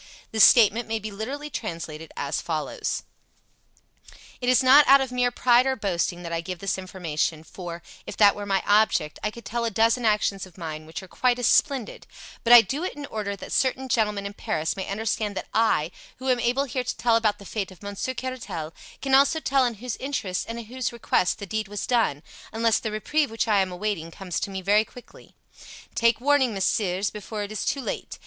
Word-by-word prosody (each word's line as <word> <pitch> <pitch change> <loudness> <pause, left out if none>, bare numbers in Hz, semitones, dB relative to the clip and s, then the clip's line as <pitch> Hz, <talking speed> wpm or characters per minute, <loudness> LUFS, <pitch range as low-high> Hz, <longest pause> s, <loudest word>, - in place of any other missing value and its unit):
This 220 -1 +5
statement 230 0 +6
may 225 0 -1
be 215 0 -6
literally 275 +9 -5
translated 165 -6 -6
as - - -2
follows: - - -3 1.4
"It 245 - 0
is 255 +1 +4
not 280 +3 +7
out 275 +1 +8
of 265 -2 -2
mere 250 0 +2
pride 245 +1 +3
or 265 - +1
boasting 175 -4 -2
that 170 -1 -5
I 165 - -1
give 180 +2 -6
this 195 +1 -2
information, 165 -4 -3
for, 170 0 -8 0.2
if - - -7
that 205 -2 +6
were 205 0 -6
my 195 -1 +1
object, 205 -7 +2
I 210 - 0
could 235 +2 -12
tell 235 0 -2
a 230 - +1
dozen 225 +3 +2
actions 210 -3 +1
of 180 - -20
mine 155 -2 -6
which 160 +4 -7
are - - -11
quite 245 +6 +1
as 245 - -1
splendid; 270 -4 +1 0.4
but 235 - +2
I 240 -1 +12
do 285 +8 -3
it 370 - -3
in 290 -1 -6
order 210 -5 -4
that - - -10
certain 260 0 +1
gentlemen 210 -4 0
in 200 - -5
Paris 160 -5 -2
may 190 - -5
understand 210 0 -2
that - - -5
I, 180 -8 +2 0.3
who 260 +1 -4
am 250 -1 +3
able 245 +3 +1
here 255 -1 -3
to - - -4
tell 235 -1 +3
about 220 -2 +2
the 200 - -13
fate 200 -1 -3
of 185 +1 -16
Monsieur 200 +6 -4
Caratal, 240 -11 -5 0.3
can 270 -1 -1
also 280 +4 +5
tell 275 -3 +2
in 240 -2 -1
whose 240 +3 -5
interest 245 -9 -3
and 230 - -4
at 235 - -7
whose 255 +3 -3
request 235 -5 0
the 205 - -7
deed 215 +2 -3
was 205 0 -4
done, 225 - +1 0.3
unless 225 0 +2
the 220 - -3
reprieve 285 +8 0
which 225 +1 -2
I 210 -2 +3
am 190 -1 0
awaiting 180 -3 -3
comes 180 0 -5
to - - -3
me 190 -1 -5
very 205 +3 +4
quickly. 245 +2 -16 0.6
Take 230 0 +2
warning, 265 -3 +2
messieurs, 195 0 0
before 210 0 -5
it 205 - -7
is 215 - -3
too 280 - -1
late! - - -5
215 Hz, 215 wpm, -25 LUFS, 190-245 Hz, 1.4 s, I